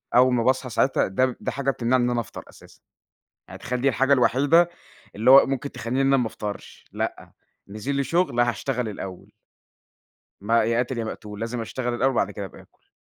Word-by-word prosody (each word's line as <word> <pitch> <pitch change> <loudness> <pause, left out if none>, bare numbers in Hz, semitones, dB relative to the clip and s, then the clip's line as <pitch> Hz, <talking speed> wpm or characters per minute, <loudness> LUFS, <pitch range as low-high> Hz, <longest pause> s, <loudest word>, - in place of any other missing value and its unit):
أول 125 0 +5
ما 115 -2 +1
باصحى 130 0 +1
ساعتها 130 +4 +1
ده 95 +7 +1
ب 130 - -3
ده - - -3
حاجة 140 0 -1
بتمنعي 125 +1 +1
إن 120 - +1
أنا 120 -1 0
أفطر 115 - -7
أساسًا، - - -18 0.7
يعني - - -10
تخيّل 125 0 -3
دي 135 - +3
الحاجة 135 +2 +2
الوحيدة 145 +6 +4 0.5
اللي 110 +4 +3
هو 135 +1 +9
ممكن 135 +1 -3
تخلّيني 125 +4 -3
إن 135 - +2
أنا 135 0 +4
ما 125 -3 0
أفطرش، 105 -2 -7
لأ، - - -4 0.4
نزِل 110 +8 -4
لي 140 0 0
شُغل 165 -8 +1
هاشتغل 120 0 -1
الأول. 95 -3 -8 1.1
ما 115 +3 +2
يا 115 0 0
قاتل 125 0 -1
يا 115 - -2
ما - - -4
مقتول، 105 0 -9
لازم 115 +1 -3
أشتغل 120 +2 -3
الأول، 130 +3 +2
وبعد - - 0
كده 100 - -6
أبقى 95 - -11
آكُل. - - -30
125 Hz, 205 wpm, -24 LUFS, 115-135 Hz, 1.1 s, هو